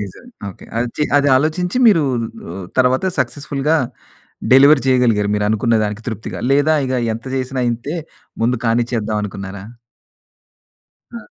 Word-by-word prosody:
నిజమే. 105 - -9 0.2
ఓకే. - - -15
అదొచ్చి 120 +5 -2 0.2
అది 145 0 +2
ఆలోచించి 175 - -1
మీరు 180 -8 +5 0.4
రు 85 - -7 0.2
తర్వాత 130 +6 +3
సక్సెస్ఫుల్‌గా 145 +1 -1 0.8
డెలివర్ 140 +1 +7
చేయగలిగారు 120 -6 +2
మీరు 105 0 0
అనుకున్న 110 +2 +1
దానికి 105 +2 -4
తృప్తిగా 110 -2 -5
లేదా 145 +3 +3
ఇగ 130 - -3 0.2
ఎంత 115 +3 -7
చేసినా 130 0 -3
ఇంతే 120 +7 -4 0.5
ముందు 125 +2 +2
కానిచ్చేద్దాం 115 -2 0
అనుకున్నారా? 100 -1 -7 1.5
ఆ! - - -5
125 Hz, 125 wpm, -18 LUFS, 110-145 Hz, 1.5 s, డెలివర్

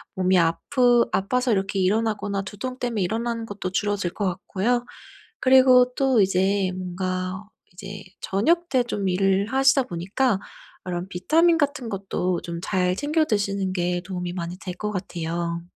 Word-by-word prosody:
몸이 185 -1 +2
아프 240 +8 +3
아파서 250 +6 +1
이렇게 195 0 -1
일어나거나 205 0 0
두통 235 +6 -6
때문에 235 -4 -2
일어나는 230 +4 -2
것도 200 -3 -5
줄어들 200 -2 -1
것 205 - -2
같고요. 200 +6 -1 0.5
그리고 255 -1 +6
또 265 -5 +3
이제 190 0 +2
뭔가 185 +1 -3 0.3
이제 195 +2 -9 0.2
저녁 335 - +1
때 260 -2 +3
좀 205 -5 -3
일을 195 +2 +2
하시다 270 0 +4
보니까 195 +4 -1 0.5
이런 175 +1 -3
비타민 330 - +3
같은 285 -4 -1
것도 185 -3 -2
좀 170 -1 -6
잘 180 -2 +1
챙겨 305 +4 +1
드시는 200 -5 -1
게 175 -1 -1
도움이 180 -2 -4
많이 175 0 -5
될 180 -2 -6
것 210 +3 -3
같아요. 170 -3 -3
195 Hz, 310 characters per minute, -24 LUFS, 185-240 Hz, 0.5 s, 그리고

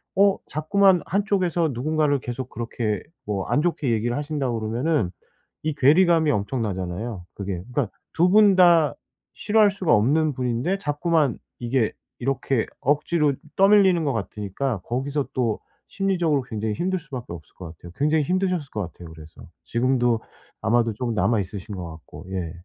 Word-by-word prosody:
어 200 0 +4
자꾸만 190 +4 +3
한쪽에서 185 -5 +1
누군가를 150 +2 +1
계속 125 +1 -5
그렇게 115 -3 -3 0.2
뭐 100 -2 -2
안 145 - +2
좋게 155 -6 0
얘기를 115 +2 0
하신다 145 -3 -2
그러면은 115 - 0 0.5
이 155 -1 -1
괴리감이 160 +2 +4
엄청나잖아요, 100 -3 -3
그게. 95 -3 -4
그러니까 135 -7 0 0.2
2 175 +2 +3
분 205 -1 +6
다 170 -4 +5 0.4
싫어할 215 -1 +4
수가 190 -7 +1
없는 145 +8 +3
분인데 125 +9 -1
자꾸만 150 - +1 0.2
이게 120 -2 0 0.3
이렇게 130 -2 0
억지로 150 +1 +1 0.2
떠밀리는 195 -3 +5
것 140 - +1
같으니까 105 +2 -3
거기서 135 +4 -2
또 115 -4 0 0.3
심리적으로 175 -7 0
굉장히 110 -3 -3
힘들 185 - -1
수밖에 140 -7 -8
없을 80 -3 -12
것 90 - -8
같아요. 85 - -12
굉장히 150 +1 +2
힘드셨을 180 -3 -1
것 105 - -3
같아요, 85 0 -12
그래서. 80 -1 -13 0.2
지금도 120 -1 +1 0.4
아마도 115 +1 +2
좀 120 +1 -3
남아 115 0 +2
있으신 100 +2 -7
것 90 -2 -6
같고 80 +3 -12
예. 90 -4 -3
135 Hz, 350 characters per minute, -24 LUFS, 110-165 Hz, 0.5 s, 분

